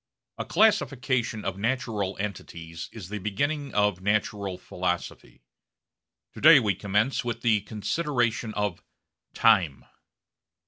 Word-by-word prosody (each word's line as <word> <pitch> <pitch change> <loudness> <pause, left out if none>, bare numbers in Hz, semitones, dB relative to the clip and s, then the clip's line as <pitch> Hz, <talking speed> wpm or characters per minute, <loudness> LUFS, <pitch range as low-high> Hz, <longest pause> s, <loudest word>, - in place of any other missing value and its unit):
A - - -3
classification 130 - +1
of 95 0 -3
natural 110 -4 -2
entities 85 -5 -6
is 100 -6 -9
the 105 0 -4
beginning 140 +9 -2
of 105 -3 +2
natural 100 -1 -1
philosophy. 90 -8 -4 0.9
To - - -10
day 155 -1 +9
we 105 -5 +1
commence 105 +8 0
with 120 -1 -4
the 110 -3 +3
consideration 120 +1 -1
of 105 -4 -2 0.5
Time. 90 -12 +3
105 Hz, 110 wpm, -26 LUFS, 95-125 Hz, 0.9 s, day